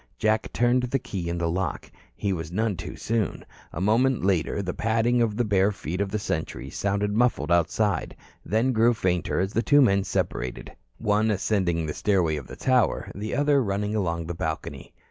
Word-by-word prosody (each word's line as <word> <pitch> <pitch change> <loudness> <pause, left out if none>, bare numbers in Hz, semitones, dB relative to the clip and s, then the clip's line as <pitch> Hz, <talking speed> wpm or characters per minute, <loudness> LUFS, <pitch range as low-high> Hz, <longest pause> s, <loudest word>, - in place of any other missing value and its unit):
Jack 110 0 +1
turned 120 +1 +2
the 125 +2 0
key 95 -8 -5
in 85 - -2
the 85 -1 0
lock. 90 +3 -3 0.2
He 100 +6 -1
was 80 -2 -5
none 110 +2 0
too - - -7
soon. 110 -3 -2 0.3
A - - -6
moment 115 +4 +2
later 95 +1 +1
the 90 -1 -3
padding 115 +2 +1
of 110 -2 0
the 120 - +1
bare 100 -1 +3
feet 90 -1 -4
of 100 - -1
the 105 - -1
sentries 85 -6 -4
sounded 100 +1 0
muffled 120 -5 +1
outside, 85 +2 +1 0.3
then 115 +5 +1
grew 115 0 +3
fainter 90 -5 0
as 95 +2 -1
the 145 +6 +4
men 100 -7 +4
separated, 65 -9 -3 0.3
one 105 0 +1
ascending 95 -5 0
the 75 - -3
stairway 90 -6 +1
of 70 -4 -6
the - - -9
tower, 130 -2 +1
the 105 +3 -4
other 145 -1 +3
running 105 0 -1
along 85 -5 -1
the 85 - -4
balcony. 80 -2 -5
100 Hz, 185 wpm, -25 LUFS, 90-115 Hz, 0.3 s, the